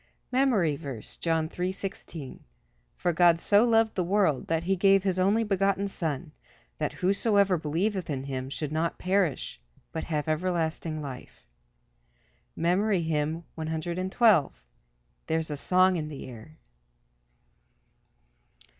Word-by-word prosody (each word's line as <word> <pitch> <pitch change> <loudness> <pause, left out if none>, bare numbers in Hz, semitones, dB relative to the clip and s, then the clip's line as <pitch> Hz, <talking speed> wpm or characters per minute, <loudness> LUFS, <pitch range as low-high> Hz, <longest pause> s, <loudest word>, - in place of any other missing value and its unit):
MEMORY 230 - +2
VERSE, 135 -8 -6
John 165 -1 0
3: 180 +3 -2
16 185 -7 -7 0.5
"For 175 - 0
God 170 0 +5
so 205 +5 +4
loved 225 -1 +3
the 185 - 0
world, 180 -6 +1
that 165 0 0
he 190 +2 +1
gave 195 +1 +4
his 190 -2 0
only 200 +5 +3
begotten 195 -1 +1
Son, 160 -5 -4 0.5
that - - -1
whosoever 200 0 +2
believeth 175 +4 -1
in 135 -3 -2
him 130 -1 -4
should 150 +1 -4
not 160 +2 -1
perish, 185 - -1 0.3
but 160 - -4
have 150 -1 -2
everlasting 160 -1 -1
life." 130 -3 -9 1.1
MEMORY 180 +2 +1
HYMN 160 +1 -1
_"There's 160 - -1
a - - -2
song 185 +4 +3
in 155 -2 -3
the 150 -2 -8
air." 125 +5 -12
170 Hz, 120 wpm, -28 LUFS, 150-195 Hz, 1.1 s, God